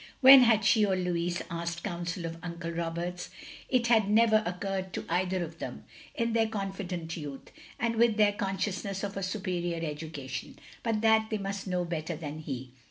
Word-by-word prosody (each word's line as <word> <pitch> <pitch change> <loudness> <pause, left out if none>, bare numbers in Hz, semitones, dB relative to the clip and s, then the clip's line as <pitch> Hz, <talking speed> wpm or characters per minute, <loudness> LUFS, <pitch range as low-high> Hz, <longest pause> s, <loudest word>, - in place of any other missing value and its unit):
When 265 0 +11
had 220 -4 +4
she 215 +1 +5
or 195 -2 +2
Louis 175 -1 -1
asked 170 0 -4
counsel 175 0 -3
of 165 0 -5
Uncle 170 -1 -5
Roberts? 170 +1 -3 0.4
It 250 -2 +2
had 220 -4 +4
never 220 0 +5
occurred 190 +1 -3
to - - -4
either 180 +1 0
of 165 0 -8
them, - - -6 0.3
in 230 -1 0
their 225 -1 +3
confident 190 -5 -4
youth, 145 -5 -8 0.3
and 230 -1 0
with 230 -1 +4
their 210 -1 +5
consciousness 195 0 -2
of 200 -1 -3
a 195 - -3
superior 180 -4 -2
education, 145 -4 -6 0.2
but 225 -2 0
that 220 0 +4
they 215 - -1
must 195 0 -4
know 180 -1 0
better 165 -1 -3
than 155 -1 -6
he. 130 -4 -6
185 Hz, 175 wpm, -29 LUFS, 170-210 Hz, 0.4 s, When